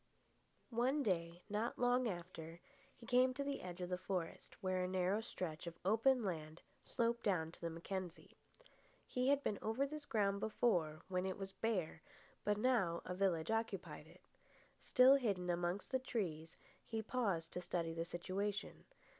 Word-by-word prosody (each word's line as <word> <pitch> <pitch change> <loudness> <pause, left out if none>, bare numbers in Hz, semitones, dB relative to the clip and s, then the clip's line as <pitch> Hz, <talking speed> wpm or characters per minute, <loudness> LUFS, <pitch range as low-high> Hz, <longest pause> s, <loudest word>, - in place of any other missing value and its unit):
One 255 +5 +2
day, 175 -4 -1
not 215 +3 -1
long 245 0 +3
after, 170 -3 -6 0.4
he 235 - -13
came 255 +1 +4
to 280 - -1
the 280 -1 -2
edge 180 0 -6
of 180 - -3
the 180 0 -1
forest, 185 -3 -3
where 185 -2 0
a - - 0
narrow 185 +3 +1
stretch 175 -7 -5
of 170 0 -6
open 230 +5 +4
land 160 -4 -4 0.2
sloped 235 -1 0
down 165 -6 +1
to - - -16
the 170 - -1
Mackenzie. 175 +1 -5 0.7
He 250 0 0
had 285 0 +4
been 205 - -1
over 225 +6 +1
this 300 +1 -6
ground 200 -3 +2
before, 175 -8 +1
when 185 0 0
it 190 - -3
was 195 -1 -4
bare, 190 -8 -1 0.4
but 210 0 +2
now 210 -8 +2
a 180 - -3
village 180 -2 +1
occupied 225 0 -2
it. - - -17 0.6
Still 260 +2 +7
hidden 195 -8 0
amongst 175 +5 -1
the 260 - +2
trees, 165 -11 -3 0.3
he 225 -1 -3
paused 200 -9 -1
to 180 - -3
study 170 -2 -1
the 165 0 -1
situation. 190 +4 -3
195 Hz, 165 wpm, -39 LUFS, 175-230 Hz, 0.7 s, Still